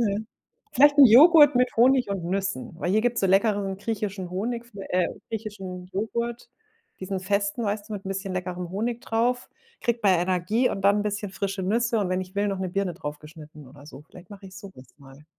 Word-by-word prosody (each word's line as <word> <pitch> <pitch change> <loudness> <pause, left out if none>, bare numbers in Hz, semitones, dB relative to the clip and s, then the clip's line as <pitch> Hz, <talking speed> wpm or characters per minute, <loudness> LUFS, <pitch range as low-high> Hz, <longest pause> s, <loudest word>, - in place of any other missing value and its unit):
Mhm. 215 -1 -1 0.5
Vielleicht 285 +2 +5
'n 280 - +11
Joghurt 295 +4 +7
mit 250 0 +1
Honig 255 +2 +4
und 195 -3 -4
Nüssen, 190 -4 -3
weil 175 - -1
hier 215 +2 +3
gibt's 240 0 0
so - - +1
leckeren 195 0 +1
griechischen 200 -3 -4
Honig, 230 +6 -3 0.3
äh, 180 -1 +1 0.2
griechischen 195 -5 -7
Joghurt, 235 +5 -4 0.5
diesen 190 0 -4
festen, 200 +4 -1
weißt 205 +1 -3
du, - - -5
mit 195 -2 -7
'n - - -5
bisschen 195 0 -4
leckerem 180 -1 -4
Honig 230 +5 -3
drauf. 245 +2 -1 0.3
Kriegt 235 -1 -1
man 195 -2 +5
ja 170 - +1
Energie 185 +7 0
und 195 - -5
dann 200 +1 +4
'n - - -2
bisschen 205 -1 -3
frische 195 0 -4
Nüsse 230 +4 0
und 195 -3 -1
wenn 185 0 -1
ich 185 +1 -11
will, 205 +1 +1
noch 195 -2 -3
'ne 190 -1 -3
Birne 195 -1 -2
draufgeschnitten 150 -2 -10
oder 145 +2 -15
so. 140 -1 -12
Vielleicht 175 +1 -16
mach 205 -1 -12
ich 190 -1 -12
so 200 -1 -10
was 130 - -14
mal. 140 +1 -16
200 Hz, 210 wpm, -25 LUFS, 185-225 Hz, 0.5 s, n